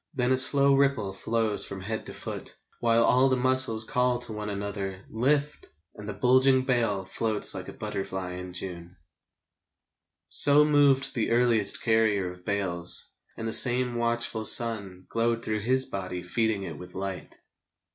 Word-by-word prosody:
Then 125 -1 0
a 130 - +2
slow 140 +1 +5
ripple 135 -8 -1
flows 110 +1 -1
along 95 -1 -9
the 110 +3 -5
body, - - -6 0.3
While 115 0 +1
all 130 +3 +2
the 130 - 0
muscles 130 -3 +2
call 125 +2 -1
to 120 -2 -3
one 105 0 -7
another: 100 -1 -6
" - - -25 0.2
Lift! 150 0 -1
" 85 - -49
and 105 0 -10
the - - -5
bulging 130 +4 +2
bale 115 -7 -1
Floats 105 +3 +2
like - - -8
a - - -10
butterfly 95 -1 -6
in 90 0 -9
June. 90 -1 -8 1.3
So 145 +1 +5
moved 145 -3 +1
the 115 - -3
earliest 115 -3 +1
carrier 110 -5 0
of 90 0 -15
bales, 90 -4 0 0.3
And 115 - -6
the 110 - -2
same 125 0 +6
watchful 120 -1 -1
sun 100 -7 +3
Glowed 115 0 -2
through 110 0 -3
his 130 +5 +1
body 90 -2 -7
feeding 110 +2 -2
it 85 -5 -9
with 90 0 -10
light. 95 -1 -7
110 Hz, 165 wpm, -25 LUFS, 95-125 Hz, 1.3 s, same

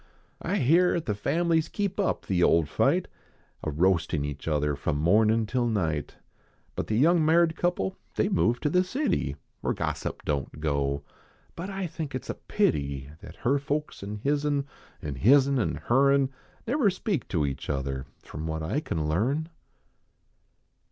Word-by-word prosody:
I - - -1
hear 170 +8 +4
at 170 - -2
the 105 - 0
families 160 +9 +1
keep 200 -1 -2
up 195 - 0
the 90 -2 +1
old 85 -3 +4
fight, - - +2 0.6
A - - -1
roastin 80 -1 +1
each 75 +1 -6
other 75 -2 +1
from 70 +1 -1
mornin 110 +8 +3
till 120 +2 0
night; 80 -10 -1 0.6
But - - -3
the 110 - 0
young 165 +5 +4
maird 165 +1 +4
couple 180 +2 -1 0.2
they - - +2
ve 205 - -2
moved 120 -8 +2
to 150 - +1
the 180 +2 +4
city, 185 - -1 0.2
Where - - -1
gossip - - -3
don 70 -2 0
t - - -15
go; 70 -2 -1 0.5
but 180 +4 -5
I 195 -1 -3
think 160 -4 -5
it 130 - -5
a - - -4
pity 70 -1 -1
That - - -11
her 140 +4 +3
folks 145 +2 -3
an 105 +1 -6
hi/. 140 - +1
n, 145 -1 0 0.4
An 70 -3 -4
hi/. 120 - +6 0.2
n 135 - +2
an 115 - 0
her 135 +3 +4
n, 140 -1 +2 0.3
Never 250 -2 +3
speak 185 - -2
to 80 -6 0
each 70 -1 -4
other 70 -1 -2 0.2
From 80 +1 -6
what 80 0 -3
I 90 - 0
can 80 - -2
learn. 130 - 0
115 Hz, 180 wpm, -27 LUFS, -, 0.6 s, hi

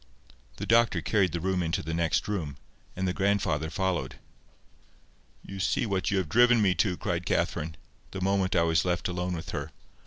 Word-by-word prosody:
The - - -5
doctor 115 -5 +4
carried 95 0 +1
the 85 - -2
child 95 +1 0
into 80 -1 -1
the 80 +2 -4
next 85 -1 0
room, 80 -10 -3 0.4
and 95 0 -1
the 90 - 0
grandfather 95 -6 0
followed. 95 0 -2 1.3
"You 100 - -8
see 95 - +1
what 95 -4 -1
you 100 - +1
have 95 -4 0
driven 120 +6 +5
me 100 -4 +3
to!" 90 +1 0
cried 85 +1 -2
Catherine, 80 +1 -1 0.3
the 95 - -6
moment 95 0 +1
I 85 - +4
was 80 0 +2
left 90 -1 -1
alone 90 0 -2
with 85 +2 -6
her. 70 +2 -4
90 Hz, 185 wpm, -28 LUFS, 85-100 Hz, 1.3 s, driven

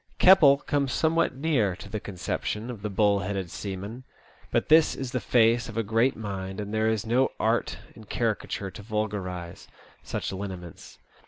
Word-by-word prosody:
Keppel 165 -7 +7
comes 140 -1 -1
somewhat 165 -3 +1
near 130 - +1
to 100 - -11
the 105 +1 -4
conception 105 +5 -4
of 110 -5 -9
the 105 - -3
bull 100 0 +3
headed 95 -2 -3
seaman; 100 +5 -6 0.5
but - - 0
his 160 0 +5
is 130 -2 -5
the 125 - -1
face 115 0 +3
of 115 - -8
a 115 - +1
great 115 +5 +2
mind, 95 -3 -5
and 105 0 -5
there 110 0 +2
is 110 -1 -1
no 125 +4 +2
art - - 0 0.2
in 110 - -13
caricature 105 -3 -2
to - - -10
vulgarize 100 -5 -4 0.3
such - - -4
lineaments. 95 -4 -8
110 Hz, 170 wpm, -27 LUFS, 100-125 Hz, 0.5 s, Keppel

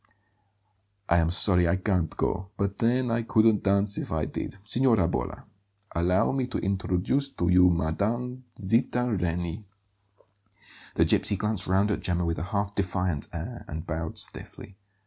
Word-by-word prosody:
"I 85 - +4
am 80 -1 +2
sorry 90 -1 +4
I 85 - +3
can't 95 -4 -1
go; 95 +1 -1
but 100 0 -2
then 120 +1 +1
I 115 +1 +1
couldn't 110 -1 +3
dance 100 +1 +1
if - - -6
I 80 -1 0
did. - - -5
Signora 115 -4 +3
Bolla, 65 -8 -3 0.5
allow 90 +2 +2
me 130 -2 -1
to 130 - -3
introduce 100 +7 0
to 85 - -1
you 90 0 +6
Mme. 110 +10 -1 0.2
Zita 115 +3 +1
Reni." 85 +2 -2 1.3
The - - +4
gipsy 100 - +2
glanced 105 -1 -1
round 95 +3 +2
at - - -2
Gemma 90 -1 -1
with 85 -3 -1
a 85 - -3
half 100 0 -2
defiant 90 -5 -1
air - - -6
and 80 +1 -6
bowed 80 0 -4
stiffly. 100 - -4
95 Hz, 155 wpm, -27 LUFS, 85-110 Hz, 1.3 s, you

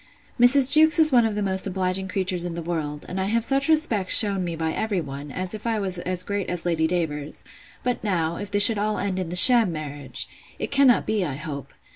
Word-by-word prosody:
Mrs. 260 +2 +6
Jewkes 315 0 +6
is 315 -2 +4
one 240 -3 +4
of 215 - -5
the 210 - -2
most 190 0 -2
obliging 190 0 -3
creatures 185 -2 -2
in 175 -1 -5
the 170 - -6
world; 155 -3 -5
and 190 +1 -4
I - - -1
have 225 +3 0
such 275 +3 0
respects 240 - +3
shewn 200 -3 +2
me 170 -2 -4
by 160 0 -3
every 215 -4 -2
one, 140 -2 -8
as 185 +4 -5
if 215 +2 -7
I 225 -1 0
was 190 -3 -4
as 180 +1 -2
great 200 -1 -4
as 180 -1 -5
Lady 160 -2 0
Davers—But 160 +8 -5
now, 170 -5 -2
if 205 - -7
this 205 0 +6
should 220 -2 +2
all 210 +1 -1
end 190 -1 -3
in 180 -3 -4
the 175 - -5
sham 230 +1 +6
marriage!—It 145 -4 -7
cannot 275 -3 +3
be, 215 -3 -1
I 145 -6 -4
hope. 145 -1 -8
190 Hz, 225 wpm, -23 LUFS, 170-220 Hz, -, Mrs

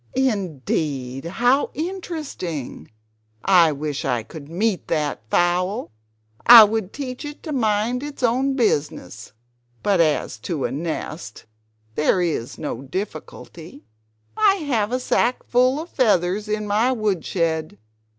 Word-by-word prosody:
"Indeed! 155 - -2
How 245 +10 +2
interesting! 310 - -5 0.6
I 175 -5 +6
wish 145 0 -4
I 125 -4 -1
could 140 +5 -11
meet 190 +3 0
with - - -36
that 150 -3 -1
fowl. 180 - +1 0.5
I 235 -2 +11
would 210 -2 -1
teach 255 -2 -6
it 295 0 -8
to 315 - -5
mind 225 -1 0
its 290 -2 -7
own 260 +3 +2
business! 150 - -1 0.5
"But 200 -3 +2
as 150 -7 0
to 150 +3 -3
a - - -2
nest 155 -4 -5 0.5
there 150 +8 +2
is 160 -9 -2
no 120 - -5
difficulty: 165 0 -7 0.5
I 420 -2 +4
have 245 - -1
a 255 - 0
sackful 255 +1 +1
of 330 +3 -7
feathers 210 -4 +1
in 210 0 -1
my 215 +5 +2
woodshed. 165 - -1
200 Hz, 125 wpm, -22 LUFS, 155-250 Hz, 0.6 s, I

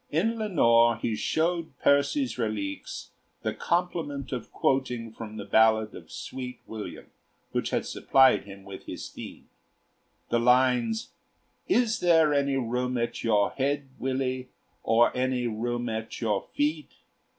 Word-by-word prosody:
In 225 +9 0
'Lenore' 120 - +4
he 115 -1 -1
showed 165 +7 -1
Percy's 140 - +2
'Reliques' 110 -4 -4 0.3
the - - -1
compliment 165 -6 -2
of 125 -4 -5
quoting 125 -4 0
from 110 -1 -8
the 100 - -6
ballad 110 -1 +4
of - - -11
'Sweet 125 -1 -6
William,' 110 -2 -8 0.4
which - - -1
had - - -1
supplied 135 -6 +4
him 100 -1 -11
with 95 0 -10
his - - -6
theme, - - -10 0.8
the 120 - +2
lines: 130 - +3 0.6
"Is 240 -9 +2
there 165 -4 +4
any 140 -1 +1
room 125 0 -1
at 120 0 -2
your 105 -3 +3
head, 140 0 -1
Willie, 130 -1 -2 0.3
or 115 +1 +3
any 125 -1 0
room 120 +2 -2
at 110 0 -4
your 105 -4 -1
feet?" 150 +1 -1
125 Hz, 135 wpm, -27 LUFS, 115-145 Hz, 0.8 s, Lenore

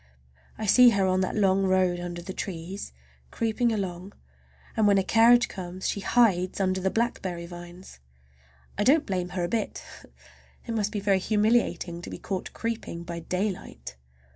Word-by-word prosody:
I 220 - -4
see 245 +4 +7
her 200 -4 +2
on 185 0 +2
that 185 - -1
long 195 -2 +3
road 185 -2 +2
under 175 -1 -6
the 190 - -6
trees, 185 +1 -6 0.4
creeping 230 +1 0
along, 190 -2 -4 0.6
and 215 -1 +3
when 200 -1 +5
a 195 - +2
carriage 235 +4 +5
comes 185 0 -6
she - - -1
hides 195 -4 +2
under 190 -1 0
the 190 - +1
blackberry 190 -6 -2
vines. 175 - -11 0.8
I - - +3
don't 290 +6 +4
blame 180 -2 -2
her 180 0 -3
a - - 0
bit. 220 +3 -3 0.8
It 230 - -4
must 210 -2 -1
be 210 - -2
very 195 -1 +2
humiliating 210 -4 +1
to - - -8
be - - -7
caught 190 -2 -5
creeping 225 -7 -4
by 170 -1 -6
daylight! 175 - -4
190 Hz, 165 wpm, -26 LUFS, 180-215 Hz, 0.8 s, see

